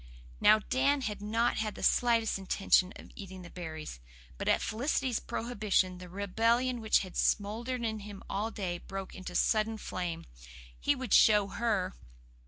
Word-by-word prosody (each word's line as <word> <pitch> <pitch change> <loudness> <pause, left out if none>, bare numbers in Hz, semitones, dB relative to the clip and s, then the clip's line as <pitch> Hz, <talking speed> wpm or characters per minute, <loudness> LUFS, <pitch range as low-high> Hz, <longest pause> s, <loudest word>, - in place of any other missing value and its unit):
Now, 215 - +7
Dan 270 +6 +1
had 210 -5 -4
not 225 +3 +1
had 215 -1 -2
the - - -8
slightest 230 -4 +3
intention 190 -1 +2
of - - -12
eating 190 -2 -9
the 175 - -11
berries. 160 - -7 0.4
But - - -4
at - - +4
Felicity's 250 +1 -1
prohibition 205 -5 -1
the 180 -1 -10
rebellion 230 +6 +1
which 220 -1 +3
had 185 -2 -8
smouldered 235 +4 0
in 220 -1 -2
him 205 -1 -9
all 210 +3 -2
day 185 -6 -4
broke 195 +1 -7
into 180 -1 -8
sudden 220 +3 +2
flame. 175 -5 -4 0.5
He 285 - +2
would 260 -5 -3
show 210 -2 +6
her! 200 -4 -1
210 Hz, 160 wpm, -31 LUFS, 190-230 Hz, 0.5 s, Now